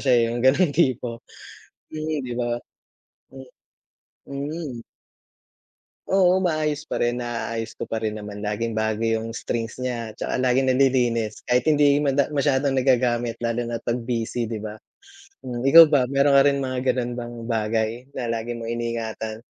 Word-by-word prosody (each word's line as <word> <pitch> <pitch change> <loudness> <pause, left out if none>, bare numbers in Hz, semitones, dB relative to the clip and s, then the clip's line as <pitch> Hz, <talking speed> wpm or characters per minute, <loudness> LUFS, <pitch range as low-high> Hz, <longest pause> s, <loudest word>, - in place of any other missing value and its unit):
siya, 130 - +2
eh, - - +3
'yung 120 +1 -3
gano'ng 145 +5 +4
tipo. 125 -6 0 0.7
Mm, 155 0 -2
di 125 - -4
ba? 120 -1 -1 0.8
Mm, 130 -1 -12 0.8
Mm. 140 -2 -5 1.3
Oo, 185 -1 +4
maayos 155 -4 -1
pa - - -2
rin. 120 +1 0
Naaayos 115 -1 -4
ko - - -8
parin 110 -1 -2
naman 105 -1 -7
laging 110 +2 -2
bago 110 0 -1
'yung 115 0 -1
strings 115 -1 -3
niya, 120 -3 -3
'tsaka - - -3
laging 130 +1 +2
nalilinis, 125 -4 +1
kahit 125 +2 +2
hindi 145 -2 +4
mada 140 -1 +1
masyadong 140 -2 +1
nagagamit 120 -2 +2
lalo 115 0 -1
na't 115 -1 -4
'pag 120 +1 -1
busy, 120 -1 -2
di 110 -1 -5
ba? 110 0 -7 0.7
Hmm, 125 -2 -5
ikaw 150 +5 +8
ba 135 -4 +3
meron 140 +2 +3
ka - - +6
rin 140 -1 +1
mga 130 -1 -2 0.2
gano'n 125 -1 -2
bang 120 0 -7 0.2
bagay 110 0 0 0.3
na 120 -3 -2
lagi 115 +1 -3
mong 115 0 -5
iniingatan? 115 -2 -4
120 Hz, 155 wpm, -23 LUFS, 115-140 Hz, 1.3 s, ikaw